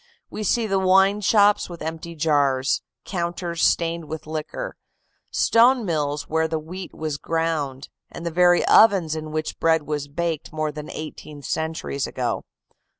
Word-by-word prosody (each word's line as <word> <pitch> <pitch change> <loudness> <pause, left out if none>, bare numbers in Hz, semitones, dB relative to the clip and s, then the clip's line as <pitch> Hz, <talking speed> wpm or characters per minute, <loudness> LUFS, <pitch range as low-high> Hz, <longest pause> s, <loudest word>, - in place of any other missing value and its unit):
We - - -5
see 230 +3 +1
the 195 -2 +1
wine 195 +2 +4
shops 205 0 +4
with 170 -2 -8
empty 160 +1 -5
jars, 140 -4 +2 0.2
counters 170 -2 -3
stained 170 -1 +1
with 160 0 -7
liquor, 155 - -5 0.5
stone 240 +1 +4
mills 150 -4 -1
where 160 0 +1
the 160 0 -2
wheat 175 +4 -7
was 155 -3 -4
ground, 155 -5 -2 0.2
and 170 - -8
the 170 - -1
very 175 +1 +4
ovens 190 -8 +5
in 155 -1 -6
which 155 0 -3
bread 160 -1 +3
was 145 -1 -3
baked 160 +1 -3
more 155 -1 -2
than 150 0 -8
eighteen 150 -1 -8
centuries 160 -1 -2
ago. - - -2
160 Hz, 150 wpm, -23 LUFS, 155-180 Hz, 0.5 s, ovens